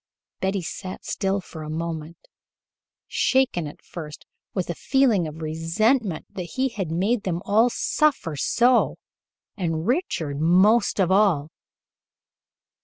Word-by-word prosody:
Betty 190 -1 -1
sat 185 +3 -7
still 195 -1 -1
for 160 -3 -10
a 155 - -6
moment, 160 0 -4 0.9
shaken 260 - +1
at 145 - -12
first 155 -3 -9 0.3
with 185 -3 -2
a - - -2
feeling 235 - +2
of 155 +1 -8
resentment 170 - 0
that 180 -3 -6
he 265 +1 +2
had 195 -8 -4
made 200 +8 +1
them 180 -4 -2
all 220 +4 +4
suffer 265 - 0
so, 240 - +3 0.6
and 165 -4 -2
Richard 175 - -1
most 200 +8 +4
of 190 -1 +3
all. 185 -7 +3
185 Hz, 125 wpm, -24 LUFS, 160-220 Hz, 0.9 s, all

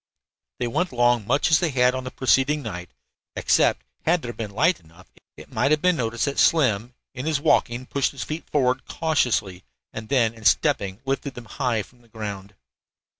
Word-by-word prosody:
They 125 - -2
went 175 +9 -1
along 120 -3 +2
much 140 +5 +2
as 155 - +6
they 170 -2 0
had 125 -2 +3
on 130 0 -4
the - - -4
preceding 135 +4 +1
night, 90 -6 -6 0.5
except, - - +2 0.2
had 170 0 +2
there 120 -1 -5
been 110 -3 -5
light 155 - +2
enough, 85 +3 -19 0.3
it - - -13
might - - +1
have 155 0 +3
been 180 -2 +3
noticed 115 -2 -1
that 140 -1 -2
Slim, 125 -6 +2 0.2
in 130 +3 -5
his 155 -3 +1
walking, 130 -5 +1
pushed 140 +1 0
his 140 - -6
feet 155 +2 -6
forward 130 -3 +1
cautiously, 125 - 0 0.3
and 110 0 -7
then 120 -5 +2
in 110 -1 -15
stepping 95 - +1
lifted 135 0 -3
them 120 - -9
high 115 -1 -1
from 125 +3 -22
the 120 - -24
ground. 100 -3 -7
125 Hz, 190 wpm, -24 LUFS, 110-140 Hz, 0.5 s, as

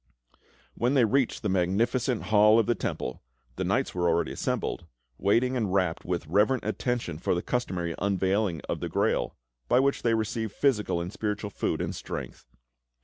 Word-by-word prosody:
When 125 - +1
they 125 -4 +5
reached 130 +2 +1
the 105 - 0
magnificent 105 +7 +1
hall 105 +1 +5
of 115 - +4
the 120 - +2
Temple, - - -4 0.3
the - - -2
knights - - 0
were 90 -1 +1
already 85 0 +1
assembled, 85 - -2 0.3
waiting 115 +6 +2
with 120 -4 0
rapt 90 -3 0
and 90 -1 -1
reverent 105 +9 +2
attention 115 - -2
for 90 - 0
the 85 - -2
customary 90 -9 -2
unveiling 95 -2 0
of - - -4
the - - -4
Grail, - - 0 0.3
by 125 - +4
which 140 +1 +1
they 115 -1 +2
received 110 -1 -2
physical 110 -10 +1
and 90 +3 -5
spiritual 105 -1 -3
food - - -1
and - - -2
strength. - - -7
105 Hz, 170 wpm, -27 LUFS, 90-120 Hz, 0.3 s, they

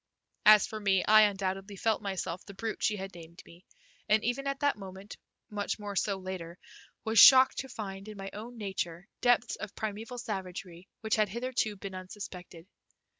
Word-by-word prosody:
As 215 -1 +9
for 220 -3 -6
me, 195 -3 +2
I 215 0 +7
undoubtedly 195 0 -4
felt 220 +3 0
myself 190 -3 -4
the 200 - -12
brute 220 +2 -4
she 210 - +1
had 195 0 -6
named 170 0 -12
me, 175 +3 -17 0.4
and 215 0 +4
even 245 +4 -1
at 275 0 -3
that 285 -1 +2
moment, 195 0 -10 0.4
much 205 -1 -2
more 205 -2 -6
so 200 0 0
later, 185 -2 -7 0.5
was 220 -1 +3
shocked 260 +2 +9
to 265 - -5
find 195 -4 -7
in 215 -1 -9
my 195 0 -6
own 235 +4 -8
nature 190 -3 -4
depths 245 -1 +2
of 210 -2 -7
primeval 220 +3 -5
savagery 190 -5 -6
which 220 -1 0
had 215 -2 +2
hitherto 235 -1 -2
been 195 -1 -8
unsuspected. 185 -2 -9
205 Hz, 175 wpm, -30 LUFS, 190-220 Hz, 0.5 s, As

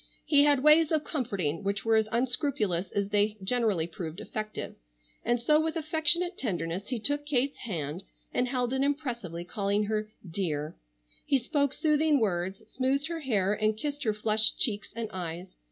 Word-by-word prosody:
He 285 -1 +5
had 285 -2 +3
ways 305 +1 +6
of 310 -2 +1
comforting 200 - -2
which 200 +1 -1
were 225 0 +4
as 220 -1 +3
unscrupulous 230 - 0
as 200 -1 -1
they 210 +1 +1
generally 210 -6 +1
proved 165 0 -7
effective, 215 -1 -5 0.5
and 240 +1 +1
so 300 +6 +4
with 320 +1 -2
affectionate 325 +3 +2
tenderness 185 -4 -3
he 250 -3 -2
took 290 +6 +1
Kate's 280 -1 0
hand 170 - -4 0.3
and 250 - +1
held 250 -1 -1
it 265 - 0
impressively, 240 - -2
calling 200 +2 0
her 215 0 -2 0.2
"dear." 160 -4 -3 0.5
He 275 - +4
spoke 280 +2 +1
soothing 300 0 +2
words, 190 -3 -1
smoothed 275 +4 0
her 335 -1 -3
hair, 210 -9 +1
and 215 0 0
kissed 290 +4 -4
her 215 -4 +1
flushed 215 +1 +3
cheeks 210 -3 0
and 230 -1 -3
eyes. 180 0 -5
225 Hz, 170 wpm, -29 LUFS, 195-285 Hz, 0.5 s, ways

